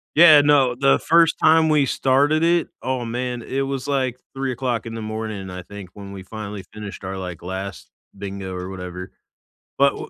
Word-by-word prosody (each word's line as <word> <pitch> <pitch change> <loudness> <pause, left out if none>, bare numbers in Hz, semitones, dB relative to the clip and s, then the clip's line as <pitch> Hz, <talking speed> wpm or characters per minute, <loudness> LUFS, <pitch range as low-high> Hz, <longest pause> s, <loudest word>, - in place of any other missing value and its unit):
Yeah, 155 -2 +9
no, 140 -4 +4
the 135 +2 +3
first 165 0 +4
time 160 0 +5
we 150 -3 +3
started 145 +5 +2
it, 170 -1 +3
oh 130 -2 -2
man, 120 +1 -3
it 135 +3 -3
was 135 -1 -3
like 130 -3 -1 0.2
3:00 130 -3 -2
in 115 - -6
the 115 - -5
morning, 110 -3 -5
I 90 0 -7
think, 100 -1 -10
when 100 -1 -10
we 95 -1 -8
finally 105 -1 -7
finished 105 -2 -8
our, 95 +1 -4
like, 90 -3 -6
last 95 +1 -6 0.3
bingo 95 -1 -6
or 90 0 -5
whatever. 90 -1 -7 0.7
But 140 0 +4
wh - - -7
120 Hz, 185 wpm, -22 LUFS, 100-135 Hz, 0.7 s, Yeah